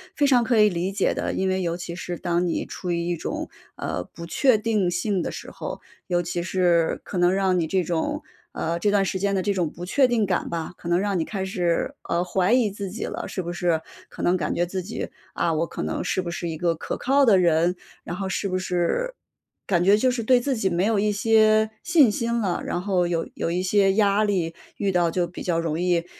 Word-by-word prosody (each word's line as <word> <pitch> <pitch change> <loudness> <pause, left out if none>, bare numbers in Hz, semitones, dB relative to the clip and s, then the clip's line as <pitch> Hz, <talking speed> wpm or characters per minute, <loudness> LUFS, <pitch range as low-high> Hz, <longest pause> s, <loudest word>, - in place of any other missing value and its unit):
非 290 - +2
常 255 -3 +5
可 235 -1 +1
以 210 - +6
理 175 +1 -2
解 200 - +1
的， - - -2
因 190 0 0
为 185 0 0
尤 170 -1 -1
其 175 -1 -6
是 175 -2 -5
当 175 +1 0
你 165 - -1
处 180 - -6
于 170 0 0
一 175 -1 -1
种， - - -4 0.3
呃， 90 - -3
不 170 - -8
确 250 +6 +3
定 215 -4 +1
性 180 +1 0
的 - - -2
时 - - -8
候， - - -6 0.3
尤 175 -1 +1
其 175 0 -3
是 175 -2 +1
可 185 - -5
能 175 +1 +4
让 190 -2 +2
你 160 - 0
这 185 +1 +1
种 165 -1 -2 0.3
呃， 170 +1 -2
这 205 - +2
段 200 -1 +3
时 190 0 -2
间 200 0 0
的 190 - +1
这 200 +1 0
种 175 -5 0
不 175 +3 -8
确 260 +7 +3
定 230 -4 +1
感 185 -2 -1
吧， 165 -1 -3
可 170 - -9
能 175 0 +3
让 195 -2 0
你 160 - 0
开 195 -3 -4
始， 175 -3 -1
呃， 170 +1 +1
怀 180 +3 +1
疑 235 -5 +3
自 200 -1 -5
己 220 +5 -5
了， - - -4
是 185 - -4
不 175 - -4
是 175 -2 0 0.3
可 - - -8
能 180 +1 +3
感 - - -2
觉 175 - +1
自 185 +1 -4
己 210 +6 -5 0.2
啊， 165 - 0
我 165 +2 0
可 - - -5
能 - - -2
是 185 +1 -1
不 170 -1 -5
是 170 0 -4
一 160 - -3
个 170 0 +1
可 - - -4
靠 275 +2 +3
的 205 -5 +6
人？ 170 0 +3 0.3
然 175 - -4
后 190 0 -3
是 195 - -1
不 185 -1 -1
是 185 - -1 0.5
感 175 -3 +2
觉 200 +2 +5
就 255 +3 +3
是 245 -2 -2
对 250 +2 +5
自 265 +1 -1
己 195 -4 0
没 175 +3 +1
有 220 -1 +2
一 210 +1 +2
些 215 +1 +4
信 315 -9 +5
心 235 +2 -1
了， 190 -5 -1
然 175 - -2
后 185 -3 +1
有 165 -1 -1
有 165 - -2
一 180 +1 0
些 195 +1 +3
压 205 0 +3
力 175 -5 0 0.2
遇 200 -2 0
到 175 -3 +2
就 175 -1 0
比 175 - -8
较 170 -2 0
容 165 -1 -1
易 175 -1 +1
185 Hz, 265 characters per minute, -24 LUFS, 175-205 Hz, 0.5 s, 以